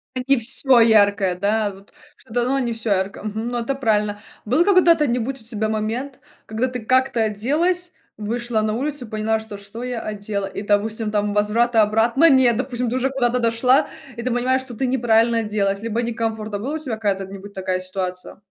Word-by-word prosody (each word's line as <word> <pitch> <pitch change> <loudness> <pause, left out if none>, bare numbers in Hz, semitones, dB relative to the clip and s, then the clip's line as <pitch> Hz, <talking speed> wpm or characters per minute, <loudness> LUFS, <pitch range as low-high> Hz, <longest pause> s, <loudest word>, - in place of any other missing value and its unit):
Ин 255 - -2
и 275 -1 +4
всё 250 +2 +5
яркое, 205 -4 +4
да? 205 +2 0
Вот 195 +1 -17 0.2
что-то 240 +2 -2
но 270 +3 0
не 240 -3 -1
всё 225 -1 -3
яркое 195 +1 -1
мгм, 215 +2 -4
ну, 240 0 -2
это 255 +4 -2
правильно. 210 -5 0 0.3
Был 265 +10 +2
когда-то 340 -6 +4
нибудь 250 +3 -2
у - - -12
тебя 220 -2 -2
момент, 225 +5 -3 0.3
когда 220 +4 -1
ты 250 -1 -5
как-то 255 0 +2
оделась, 315 - 0 0.2
вышла 225 +1 -2
на 215 0 -1
улицу 275 +2 -2
и 220 - -15
поняла, 220 +1 -1
что: 220 -2 -9
что 200 +4 -9
я 245 -2 -4
одела 205 -1 -4
и, 200 - -6
допустим, 210 +1 0
там 205 -1 0
возврата 225 +3 +2
обратно 230 +9 +3
нет, 255 -5 +4
допустим, 250 -1 -2
ты 250 - -1
уже 265 +1 0
куда-то 250 -2 0
дошла, 250 +5 +2 0.3
и 235 - -4
ты 255 - -2
понимаешь, 255 +2 +1
что 255 -2 -9
ты 260 - -1
неправильно 235 -2 +2
оделась, 205 -2 -1
либо 230 +1 -2
некомфортно. 225 -3 -3
Была 270 +8 -4
у - - -1
тебя 270 -8 -4
какая-то 200 -3 -2
нибудь 200 +1 -11
такая 185 -1 -2
ситуация? 185 0 -5
225 Hz, 195 wpm, -21 LUFS, 210-250 Hz, 0.3 s, всё